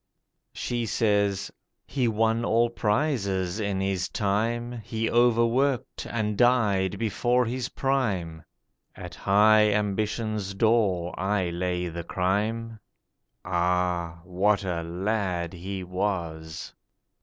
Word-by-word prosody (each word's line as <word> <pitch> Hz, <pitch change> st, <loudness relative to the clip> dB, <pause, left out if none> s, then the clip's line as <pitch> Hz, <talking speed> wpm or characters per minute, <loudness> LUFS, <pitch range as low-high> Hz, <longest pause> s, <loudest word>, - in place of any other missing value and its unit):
She 120 Hz, -2 st, -3 dB
says: 100 Hz, -3 st, +1 dB, 0.3 s
'He 130 Hz, -3 st, 0 dB
won 115 Hz, +1 st, +1 dB
all 115 Hz, +1 st, +2 dB
prizes 105 Hz, -, 0 dB
in 100 Hz, -2 st, -1 dB
his 95 Hz, -1 st, -1 dB
time: 115 Hz, +4 st, -1 dB
He 115 Hz, +1 st, -2 dB
overworked, 120 Hz, +2 st, +2 dB
and 105 Hz, -2 st, -1 dB
died 100 Hz, -5 st, +2 dB
before 120 Hz, +3 st, +1 dB
his 125 Hz, +2 st, -3 dB
prime. 100 Hz, -, -1 dB, 0.5 s
At 90 Hz, -3 st, -8 dB
high 105 Hz, +5 st, +4 dB
ambition's 105 Hz, 0 st, -1 dB
door 100 Hz, -5 st, +2 dB
I 95 Hz, -2 st, 0 dB
lay 90 Hz, 0 st, -2 dB
the 85 Hz, 0 st, -5 dB
crime. 105 Hz, +6 st, -1 dB, 0.7 s
Ah, 90 Hz, -2 st, 0 dB
what 100 Hz, +3 st, +1 dB
a 90 Hz, -3 st, -2 dB
lad 90 Hz, 0 st, -2 dB
he 95 Hz, +2 st, -5 dB
was! 85 Hz, -4 st, -3 dB
100 Hz, 105 wpm, -26 LUFS, 90-115 Hz, 0.7 s, high